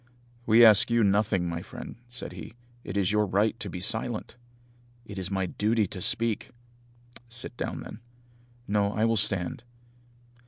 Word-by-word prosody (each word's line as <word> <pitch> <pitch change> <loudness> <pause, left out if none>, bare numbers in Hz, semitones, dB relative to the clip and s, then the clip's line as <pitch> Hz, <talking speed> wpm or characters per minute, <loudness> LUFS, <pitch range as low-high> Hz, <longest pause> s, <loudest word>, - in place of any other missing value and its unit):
"We 115 +2 +7
ask 110 +2 +7
you 115 -1 +3
nothing, 100 -2 +2
my 85 0 -3
friend," 120 +6 -9
said 120 -6 -6
he, 90 +4 -10 0.3
"it - - -5
is 95 -2 +1
your 105 0 +2
right 105 +5 +1
to 105 -4 -5
be 90 - -6
silent." 110 +4 -2 0.7
"It 100 -3 -7
is 95 -1 -3
my 95 -1 -1
duty 110 +4 +1
to 95 0 -7
speak." 115 +2 0 0.8
"Sit 120 +1 -9
down, - - -4
then." - - -9 0.7
"No, 100 0 +1
I 110 - +1
will 115 0 +2
stand." 100 +4 +1
105 Hz, 160 wpm, -27 LUFS, 95-115 Hz, 0.8 s, We